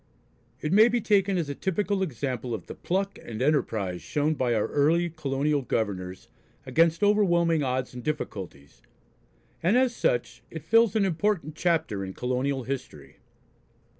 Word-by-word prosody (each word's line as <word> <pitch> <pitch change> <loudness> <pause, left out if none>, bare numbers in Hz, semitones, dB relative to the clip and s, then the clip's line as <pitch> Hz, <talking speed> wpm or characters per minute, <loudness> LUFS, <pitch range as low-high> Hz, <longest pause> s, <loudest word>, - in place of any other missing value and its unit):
It 150 +3 -1
may 215 +3 +7
be 240 0 +1
taken 200 -3 +2
as 165 -4 -1
a 140 - -3
typical 195 +4 -1
example 125 - -3
of 90 - -9
the - - -8
pluck 195 +2 -2
and 110 -2 -7
enterprise 110 - 0
shown 150 +1 0
by 125 -5 0
our 105 - +1
early 165 +4 +2
colonial 145 -1 -1
governors 100 -4 -3 0.4
against 165 +6 +2
overwhelming 175 -6 +3
odds 130 -2 -2
and 125 -1 -8
difficulties, 95 - -5 0.8
and 190 +8 +3
as 255 -2 +2
such - - -1
it - - -8
fills 230 -2 +4
an 210 -3 +3
important 180 -3 0
chapter 160 - 0
in 95 0 -6
colonial 130 +2 -1
history. 125 - -7
150 Hz, 150 wpm, -27 LUFS, 125-190 Hz, 0.8 s, may